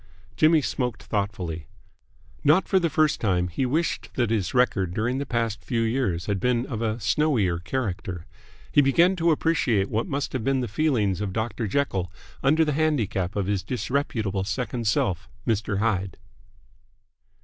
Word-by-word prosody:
Jimmy 155 +3 +4
smoked 125 -6 -2
thoughtfully. 95 -6 -3 0.8
Not 155 +6 +4
for 190 - +3
the 170 -2 +1
first 155 0 +2
time 90 -4 +1
he 125 +10 -1
wished 160 +6 -1
that 120 -4 +1
his 100 -7 0
record 100 -8 +1
during 120 +4 0
the 140 - -4
past 115 -4 -1
few 120 -3 -1
years 110 -7 0
had 100 -2 -1
been 125 +3 +1
of 115 -5 -4
a 110 0 -1
snowier 100 - +1
character. 95 -7 -3 0.5
He 145 - +6
began 170 +7 +4
to 170 0 +2
appreciate 145 -11 +1
what 110 +2 0
must 140 0 -3
have 130 -4 -2
been 135 +1 +1
the 125 - -2
feelings 110 - +1
of 100 -3 -3
Dr. 110 +1 -2
Jekyll 95 - -1 0.3
under 155 +4 +4
the 150 - 0
handicap 110 - 0
of 100 -2 0
his 100 -1 0
disreputable 115 -6 -2
second 115 +4 -3
self, 95 -2 0 0.2
Mr. 110 -3 0
Hyde. 100 -3 -1
115 Hz, 160 wpm, -25 LUFS, 100-135 Hz, 0.8 s, He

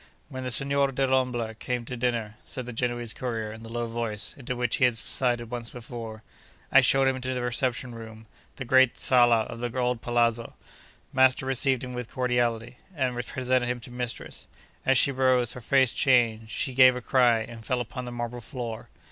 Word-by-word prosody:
When 130 0 -6
the 130 - -3
Signor 140 +3 +2
Dellombra 125 -4 0
came 120 +2 -4
to 125 - -5
dinner 115 -3 -2
(said 130 - -5
the 125 - -7
Genoese 120 -1 -2
courier 115 -4 -4
in 110 - -11
the 115 - -10
low 120 0 -2
voice, 115 -3 -3
into 125 -2 -5
which 120 -1 -1
he 130 - +4
had 120 -2 +1
subsided 120 0 +1
once 120 -1 -4
before), 115 -2 -8 0.5
I 135 - +8
showed 135 +1 +3
him 135 -1 +1
into 130 0 -3
the 125 - -2
reception 125 0 -1
room, 110 -1 -10 0.3
the 130 - -6
great 130 0 +4
sala 120 -3 +4
of 115 +1 -7
the 120 +1 -4
old 125 -2 0
palazzo. 120 -1 0 0.6
Master 130 0 +4
received 135 0 +2
him 125 -1 -6
with 125 -2 -5
cordiality, 120 -1 -1 0.2
and 130 -4 -1
presented 130 0 0
him 125 0 -2
to 120 - -10
mistress. 125 -1 -6 0.4
As 135 -1 +5
she 140 - +4
rose, 130 -2 +2
her 125 - -9
face 130 +1 +3
changed, 115 -4 +2
she 130 +3 -2
gave 130 0 +7
a 125 - -4
cry, 120 -2 +3
and 115 0 -9
fell 125 +2 -1
upon 125 +1 -5
the 120 - -6
marble 120 0 -5
floor. 120 -3 -6
125 Hz, 195 wpm, -27 LUFS, 115-130 Hz, 0.6 s, I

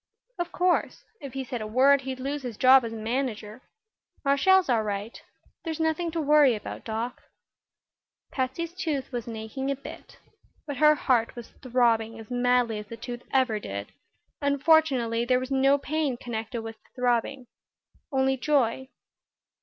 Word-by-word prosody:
"Of 345 - -2
course. 360 0 0
If 275 -3 -8
he 270 0 -3
said 245 -2 -5
a 215 - -4
word 265 +5 +4
he'd 260 -1 -5
lose 280 +3 -3
his 245 -5 -6
job 260 0 +7
as 230 - -4
manager. 225 0 -3 0.6
Marshall's 365 +7 +4
all 235 -4 +2
right. 210 +1 -4 0.4
There's 325 -2 -4
nothing 320 +1 0
to 335 - -1
worry 295 -4 +5
about, 210 - -7
Doc." 225 +2 -4 1.1
Patsy's 280 +6 -3
tooth 300 -8 -3
wasn't 235 -2 -4
aching 220 +5 -4
a 275 - 0
bit. 275 - -11 0.5
But 285 -3 -5
her 300 +1 +6
heart 245 -6 +1
was 240 -2 -9
throbbing 230 -3 +1
as 225 +1 -12
madly 245 -2 +2
as 210 - -9
the 230 - -8
tooth 240 +1 -7
ever 255 -5 +2
did, 100 - -6 0.5
and 280 -1 0
fortunately 265 -8 +3
there 250 +1 +2
was 255 +1 -6
no 270 +1 +4
pain 285 -2 -2
connected 225 -1 -5
with 225 0 -7
the - - -29
throbbing 250 +1 0 0.7
only 265 -1 +1
joy. 265 -2 +1
255 Hz, 160 wpm, -26 LUFS, 230-280 Hz, 1.1 s, job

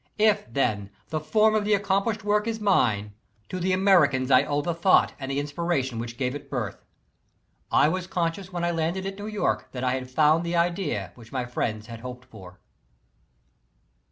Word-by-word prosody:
If, 210 - +2
tlien, 110 -6 0 0.2
the 155 - -1
form 215 +8 +3
of 215 -1 +2
the 210 0 +3
accomplished 200 +2 0
work 210 +1 +1
is 225 -1 -2
mine, 110 - +2 0.4
to 185 - -4
the 185 +1 0
Americans 170 -9 +3
I 130 - +7
owe 145 0 -1
the 170 - -1
thought 170 +3 +4
and 135 -1 -5
the 135 +1 -1
inspiration 145 -5 -2
which 120 0 -6
gave 125 -2 -1
it 145 -1 -8
birth. 120 -8 -4 0.9
I - - +5
was 180 +3 -2
conscious 175 +1 -2
when 175 -1 -3
I 175 - +1
landed 170 +3 -1
at 195 +1 -5
New 205 - -5
York 210 -1 -1
that 125 -1 -4
I 125 - +2
had 130 0 -3
found 155 +4 +3
the 170 0 -2
idea 170 0 0
which 115 -2 -15
my 130 -2 -2
friends 110 -3 -3
had 115 0 -9
hoped 125 +1 -8
for. 95 -7 -13
155 Hz, 190 wpm, -26 LUFS, 125-190 Hz, 0.9 s, I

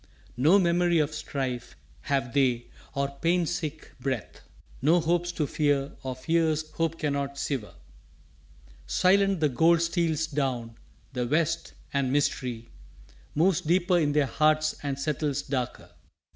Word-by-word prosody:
No 155 +10 +5
memory 175 -2 +3
of 150 -1 +1
strife 130 -5 -4 0.3
Have 135 -4 0
they, 125 -4 +2 0.3
or 140 0 +1
pain 175 +1 +2
sick 160 -2 -4
breath. 130 -3 -4 0.4
No 160 +6 +4
hopes 175 +1 0
to 155 - 0
fear 145 -1 0
or 130 -1 -4
fears 155 +2 0
hope 165 0 -1
cannot 140 -2 -2
sever. 125 - -3 1.1
Silent 195 - +3
the 150 - +4
gold 165 +6 +4
steals 165 -2 0
down 130 -6 -2 0.4
The 125 -2 -1
west, 165 +4 0 0.2
and 140 -2 +1
mystery 125 -4 -1 0.6
Moves 175 +3 +3
deeper 175 +2 +2
in 145 -3 +1
their 150 -1 +3
hearts 155 +2 +2
and 140 -2 -3
settles 145 0 -1
darker. 130 -3 -4
150 Hz, 130 wpm, -27 LUFS, 135-165 Hz, 1.1 s, No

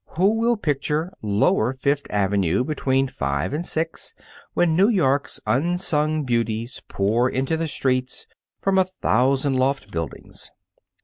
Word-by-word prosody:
Who 200 +5 +3
will 235 0 +2
picture 150 +1 -1
Lower 105 +3 +2
Fifth 140 +2 0
Avenue 100 -1 +1
between 135 -2 0
five 70 - -2
and 155 +3 -2
six, 165 -1 -4 0.4
when 170 -2 +3
New 195 +5 +5
York's 145 - +1
unsung 155 0 +1
beauties 115 -1 -2
pour 115 +6 +1
into 135 +5 -1
the 165 0 -2
streets 130 -3 -1 0.3
from 195 -1 +2
a 190 - +4
thousand 135 - +1
loft 130 -5 0
buildings? 85 -3 -6
135 Hz, 130 wpm, -23 LUFS, 115-160 Hz, 0.4 s, New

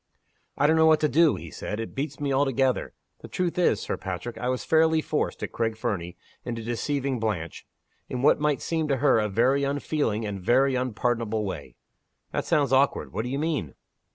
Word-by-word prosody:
"I 145 - +2
don't 160 +2 +4
know 160 0 +5
what 155 -1 +5
to 155 - +4
do," 155 +2 +4
he - - -9
said. 105 - -5
"It 115 - -5
beats 145 +4 -4
me 140 -2 -1
altogether. 135 -1 +1 0.2
The - - -10
truth 180 -1 -2
is, 140 - +3
Sir - - -3
Patrick, 95 +5 -5
I 125 - -1
was 130 0 -2
fairly 160 0 +4
forced, - - -2
at - - -4
Craig 115 -1 -1
Fernie, 90 -6 -3 0.3
into 115 -1 -4
deceiving 130 +3 -2
Blanche 100 -8 -3 0.4
in 125 0 -3
what 150 - +5
might 150 -1 0
seem 160 -2 -1
to 140 -2 +1
her 130 -3 +4
a 105 -1 0
very 130 +7 +2
unfeeling, 140 -5 -1
and 100 -2 -4
a - - -12
very 130 +7 +3
unpardonable 115 -3 -1
way." 75 -10 -6 0.6
"That - - -2
sounds 145 -6 +2
awkward! 135 +1 +2
What 110 +4 -2
do - - -3
you 135 - -2
mean?" 150 - -2
130 Hz, 205 wpm, -26 LUFS, 110-145 Hz, 0.6 s, know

